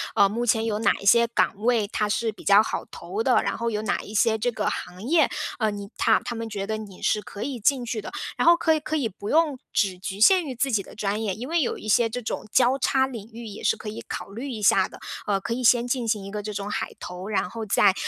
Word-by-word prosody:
呃， 200 - +6
目 225 +4 -2
前 225 -1 +2
有 215 -2 -1
哪 225 - +3
一 - - -10
些 235 +3 +6
岗 235 - +1
位， 225 0 +1
它 210 0 -1
是 225 +2 0
比 215 - -15
较 200 +2 +6
好 - - -3
投 420 - -5
的， - - +3
然 - - -1
后 235 0 -1
有 215 -1 -2
哪 215 - 0
一 210 - -10
些 220 +1 +3
这 245 +3 0
个 215 -2 -2
行 180 +2 -6
业， 310 +4 +3 0.3
嗯， 215 -3 0
你 200 0 -7
他 220 - +4
他 - - -3
们 230 -1 -5
觉 200 -2 -4
得 215 +1 -2
你 205 -4 -10
是 210 - +2
可 205 - -7
以 270 -4 -4
进 250 +3 +2
去 225 -2 -3
的。 - - -8 0.3
然 - - +1
后 340 0 +8
可 325 -1 +3
以 310 - +1
可 310 +1 -3
以 280 -7 +1
不 200 0 -8
用 310 -4 +2
只 190 -4 0
局 190 +1 -5
限 365 - +6
于 265 -3 -5
自 270 +3 0
己 215 -4 +2
的 - - -13
专 210 0 -2
业， 205 -4 -1
因 245 +4 -6
为 335 +2 +1
有 260 - -1
一 - - -9
些 225 +2 +3
这 245 +3 -4
种 220 - -4
交 255 +1 +4
叉 265 0 +2
领 230 -5 -8
域， 230 +1 -9
也 210 -2 -8
是 - - +2
可 - - -9
以 210 - -6
考 - - -5
虑 240 +7 -6
一 225 -5 -5
下 190 -1 +5
的。 - - -13 0.3
呃， 200 -2 +1
可 230 - -3
以 250 +2 -3
先 240 0 +4
进 245 -1 -1
行 210 -3 -1
一 195 - -7
个 210 0 -4
这 210 +1 -5
种 200 0 -4
海 - - -3
投， 180 +2 -7
然 190 -4 -1
后 225 +2 -6
再， 200 -1 +4
220 Hz, 305 characters per minute, -25 LUFS, 205-245 Hz, 0.3 s, 后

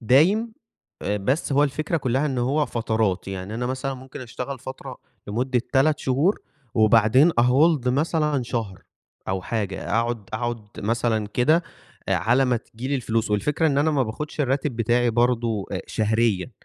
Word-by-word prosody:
دايم 175 - +3 0.5
آآ، 105 - 0
بس 130 +9 -1
هو 145 +2 +4
الفكرة 155 +4 -1
كلّها 135 0 0
إن 135 -3 -2
هو 140 +5 +1
فترات، 110 -5 -1
يعني 95 +2 -5
أنا 120 +2 -2
مثلًا 130 +2 -3
ممكن 130 +1 -10
أشتغل 130 +2 -6
فترة 130 +2 -8 0.3
لمدة 125 +4 0
3 145 +3 +3
شهور 145 +11 +1 0.3
وبعدين 110 +7 +5
آhold 130 +2 +3
مثلًا 150 +1 +1
شهر 115 -6 -4 0.5
أو 95 0 -1
حاجة 100 -2 -3
أقعد 115 -1 -1
أقعد 115 -1 -3
مثلًا 110 0 0
كده 140 +10 +2 0.5
آآ، - - +3
على 125 +4 +2
ما 125 -2 +2
تيجي 120 +2 -7
لي 140 - 0
الفلوس 115 -4 -1
والفكرة 140 +10 +1
إن 140 -3 +2
أنا 155 +2 +3
ما 145 -3 +2
باخدش 145 +7 -5
الراتب 135 -1 0
بتاعي 120 +1 +2
برضه 115 -3 +1
أ - - -1
شهريًا، 110 -2 0
125 Hz, 160 wpm, -24 LUFS, 110-140 Hz, 0.5 s, وبعدين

